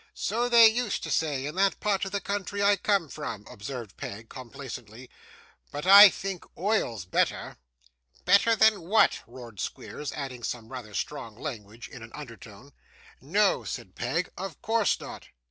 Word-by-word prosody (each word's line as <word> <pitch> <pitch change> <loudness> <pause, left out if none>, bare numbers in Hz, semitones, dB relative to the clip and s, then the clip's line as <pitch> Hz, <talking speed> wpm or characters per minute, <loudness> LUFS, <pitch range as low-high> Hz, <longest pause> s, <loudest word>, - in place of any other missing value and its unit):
'So 240 +2 -1
they 235 -1 +9
used 225 -1 -1
to - - -4
say 145 -4 0
in 150 - -4
that 195 +2 +1
part 200 -2 0
of 195 - -6
the 200 - -1
country 200 0 -3
I 200 0 +5
come 200 -4 +1
from,' 140 -9 -7
observed 115 -2 -8
Peg, 110 +3 -8
complacently, 125 -2 -9 0.6
'but 145 +3 -5
I 200 +2 +11
think 190 -1 -5
oil's 170 - -1
better.' 90 - -1 0.7
'Better 200 +5 +5
than 220 -3 +4
what?' 200 +7 +3
roared 120 -4 -11
Squeers, 150 +9 -5
adding 135 -4 -6
some 115 -1 -5
rather 115 -6 -8
strong 115 -7 -4
language 115 -4 -8
in 130 - -12
an 110 - -10
undertone. 115 -2 -11 0.5
'No,' - - +2
said - - -7
Peg, - - -2
'of 190 -4 -6
course 225 -1 +1
not. - - -9
150 Hz, 160 wpm, -27 LUFS, -, 0.7 s, I